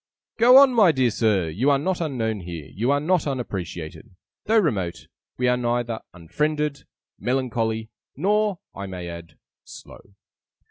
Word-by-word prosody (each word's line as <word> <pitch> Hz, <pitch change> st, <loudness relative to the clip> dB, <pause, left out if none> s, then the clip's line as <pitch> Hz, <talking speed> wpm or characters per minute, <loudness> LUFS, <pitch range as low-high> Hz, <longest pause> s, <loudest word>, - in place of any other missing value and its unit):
'Go 245 Hz, +3 st, +8 dB
on, 275 Hz, -2 st, +7 dB
my 210 Hz, -7 st, +6 dB
dear 130 Hz, -5 st, +1 dB
Sir! 105 Hz, -6 st, +1 dB
You 105 Hz, -, 0 dB
are 140 Hz, -, +4 dB
not 175 Hz, +5 st, -2 dB
unknown 115 Hz, -9 st, -2 dB
here, 85 Hz, -4 st, -7 dB
you 115 Hz, +6 st, -1 dB
are 145 Hz, 0 st, +3 dB
not 160 Hz, +1 st, +1 dB
unappreciated. 95 Hz, -, -5 dB, 0.3 s
Though 220 Hz, +2 st, +3 dB
"remote", 95 Hz, -, 0 dB, 0.3 s
we 125 Hz, -, +1 dB
are 125 Hz, -, +3 dB
neither 120 Hz, -1 st, -1 dB
"unfriended", 150 Hz, -, -2 dB, 0.3 s
"melancholy", 115 Hz, -3 st, -1 dB, 0.3 s
nor 205 Hz, +4 st, +1 dB, 0.2 s
(I 100 Hz, 0 st, -6 dB
may 90 Hz, -2 st, -6 dB
add) 85 Hz, -1 st, -10 dB, 0.3 s
"slow". 100 Hz, -, -14 dB
120 Hz, 145 wpm, -23 LUFS, 95-150 Hz, 0.3 s, Go